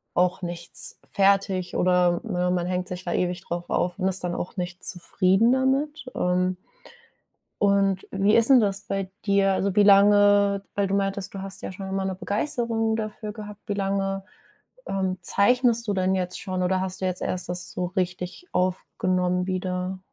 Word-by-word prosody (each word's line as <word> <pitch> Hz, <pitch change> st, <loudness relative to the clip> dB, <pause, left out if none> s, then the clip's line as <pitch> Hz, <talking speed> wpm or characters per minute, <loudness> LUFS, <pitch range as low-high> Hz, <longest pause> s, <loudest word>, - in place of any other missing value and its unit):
auch 180 Hz, +1 st, +1 dB
nichts 175 Hz, -1 st, -2 dB
fertig, 195 Hz, -2 st, +1 dB
oder, 180 Hz, -1 st, +3 dB
ne, 180 Hz, -4 st, -1 dB
man 175 Hz, -1 st, -1 dB
hängt 180 Hz, 0 st, -2 dB
sich 180 Hz, 0 st, -6 dB
da 175 Hz, -, -2 dB
ewig 180 Hz, 0 st, -1 dB
drauf 175 Hz, 0 st, -5 dB
auf 180 Hz, +1 st, 0 dB
und 185 Hz, -, +1 dB
ist 190 Hz, 0 st, -3 dB
dann 175 Hz, -1 st, -2 dB
auch 180 Hz, -, -5 dB
nicht 180 Hz, 0 st, -5 dB
zufrieden 190 Hz, +5 st, +3 dB
damit, 270 Hz, +3 st, 0 dB
ähm 180 Hz, 0 st, 0 dB, 1.1 s
und 195 Hz, -1 st, +2 dB
wie 200 Hz, +2 st, +2 dB
ist 230 Hz, +3 st, +4 dB
'n 255 Hz, -3 st, +7 dB
das 200 Hz, 0 st, -1 dB
bei 195 Hz, -1 st, -3 dB
dir? 200 Hz, -1 st, +3 dB
Also, 195 Hz, 0 st, 0 dB
wie 210 Hz, -, +5 dB
lange 200 Hz, 0 st, +5 dB
weil 200 Hz, -1 st, +1 dB
du 195 Hz, -, 0 dB
meintest, 195 Hz, -1 st, -2 dB
du 195 Hz, -, -6 dB
hast 195 Hz, 0 st, -6 dB
ja -, -, -6 dB
schon 190 Hz, 0 st, -7 dB
immer 195 Hz, 0 st, -2 dB
'ne 190 Hz, -1 st, -2 dB
Begeisterung 225 Hz, +3 st, -1 dB
dafür 215 Hz, -1 st, -5 dB
gehabt. 210 Hz, -1 st, -9 dB
Wie 205 Hz, -, -1 dB
lange, 195 Hz, -1 st, -1 dB, 0.6 s
ähm, 190 Hz, -1 st, -1 dB
zeichnest 235 Hz, +5 st, +3 dB
du 205 Hz, -, +1 dB
denn 190 Hz, 0 st, +1 dB
jetzt 180 Hz, -1 st, -2 dB
schon 185 Hz, -1 st, -3 dB
oder 185 Hz, +1 st, +1 dB
hast 190 Hz, 0 st, -3 dB
du 185 Hz, -, 0 dB
jetzt 185 Hz, -1 st, -1 dB
erst 180 Hz, -1 st, -2 dB
das 175 Hz, 0 st, 0 dB
so 180 Hz, -, -3 dB
richtig 180 Hz, -, -4 dB
aufgenommen 180 Hz, 0 st, 0 dB
wieder? 185 Hz, 0 st, -3 dB
190 Hz, 180 wpm, -25 LUFS, 180-200 Hz, 1.1 s, n